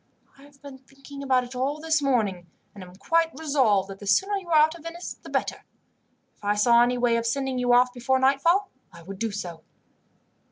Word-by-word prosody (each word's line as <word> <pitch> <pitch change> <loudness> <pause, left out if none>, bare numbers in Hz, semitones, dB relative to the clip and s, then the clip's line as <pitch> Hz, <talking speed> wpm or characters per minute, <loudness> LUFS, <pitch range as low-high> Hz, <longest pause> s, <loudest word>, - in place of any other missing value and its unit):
I 275 - -20
have 285 -1 -21
been 275 -2 -11
thinking 275 +2 -13
about 260 -2 +1
it 245 +1 -10
all 270 +4 -2
this 315 -1 0
morning, 210 -10 0 0.3
and 200 - -10
am 180 0 -14
quite 330 - 0
resolved 260 -11 +1
that 195 - -10
the 205 - -10
sooner 385 - +2
you 375 -3 -9
are 320 - +4
out 310 +1 +4
of 340 - -13
Venice 335 +2 -7
the - - -12
better. - - -3 0.7
If - - -32
I 205 0 +1
saw 235 +3 +4
any 245 +1 +2
way 240 -1 +2
of 230 0 -2
sending 265 +1 -2
you 245 0 +1
off 245 +1 +4
before 255 +2 0
nightfall 280 +9 +2 0.2
I 170 - -14
would 190 +2 -9
do 225 0 -1
so. 180 -5 -7
255 Hz, 215 wpm, -25 LUFS, 220-290 Hz, 0.7 s, are